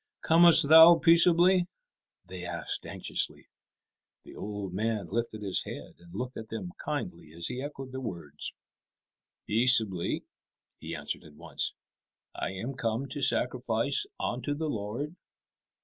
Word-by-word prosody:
"Comest 165 -2 +7
thou 160 +2 +9
peaceably?" 175 +2 +5 0.6
they 90 0 -9
asked 85 -1 -5
anxiously. - - 0 0.8
The - - -14
old 100 -3 -6
man 105 -2 -2
lifted 115 -2 -3
his 95 -2 -1
head - - -9
and 85 0 -16
looked 125 +1 -5
at 110 -1 -8
them 95 -6 -6
kindly - - -5
as 85 +1 -3
he 125 +1 -5
echoed 135 -2 -8
their 130 0 -6
words. 85 - -5 0.9
"Peaceably," 110 -5 +2 0.6
he - - -7
answered - - -4
at 75 -2 -16
once; - - -3 0.6
"I - - -4
am 95 +8 -6
come 125 +1 -3
to 145 +2 -5
sacrifice 125 - 0
unto 145 - -3
the 155 +1 -3
Lord." 120 - -5
115 Hz, 135 wpm, -28 LUFS, 100-145 Hz, 0.9 s, thou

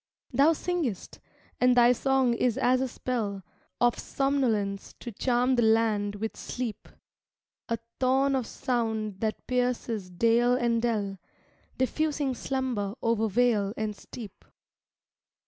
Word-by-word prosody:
Thou 280 +6 +5
singest, 320 - -3 0.4
and 250 0 +4
thy 240 0 +7
song 265 0 +2
is 235 0 +1
as 255 +1 +3
a 265 - 0
spell 220 -6 -3 0.4
Of 240 -1 +2
somnolence 230 -8 -1
to 240 - -7
charm 250 +3 +1
the - - +4
land 220 -2 +2
with 220 +2 -4
sleep; 245 -4 -5 0.8
A 230 - 0 0.2
thorn 270 +2 +3
of 255 -3 -1
sound 220 -5 -2
that 220 0 -2
pierces 245 -5 -1
dale 230 +6 +3
and 235 -2 +1
dell, 205 -5 -1 0.6
Diffusing 285 +1 0
slumber 245 -6 -2
over 230 -1 +2
vale 215 -2 +2
and 215 -1 -2
steep. 205 -1 -11
235 Hz, 125 wpm, -28 LUFS, 215-255 Hz, 0.8 s, thy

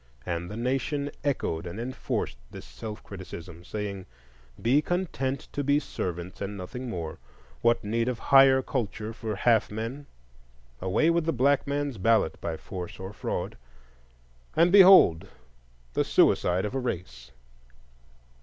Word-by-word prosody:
And 85 0 -3
the 105 - -6
Nation 135 +4 -1
echoed 90 - -1
and 85 +6 -6
enforced 125 +2 -3
this - - -10
self 105 - -8
criticism, 90 -3 -9
saying: 100 -1 -5 0.5
Be 130 +6 +3
content 150 -6 -2
to 145 - -2
be 140 +1 +3
servants, 90 - -5
and 100 0 -4
nothing 125 +7 -6
more; 85 -7 -5 0.4
what 120 0 +3
need 115 +3 0
of 125 -2 -1
higher 135 +1 +6
culture 110 -3 -3
for 110 -2 -4
half 115 +1 +3
men? 115 +7 -5 0.7
Away 95 - +2
with 170 -1 +1
the 165 - +2
black 140 +3 +2
man's 140 -5 -2
ballot, 110 -3 +2
by 80 -1 -3
force 90 +3 -7
or 95 +2 -7
fraud,—and - - -4
behold 190 - +8 0.7
the - - +2
suicide 90 +3 +3
of 105 - -4
a 135 - -1
race! 85 - -5
110 Hz, 135 wpm, -27 LUFS, 90-135 Hz, 0.7 s, behold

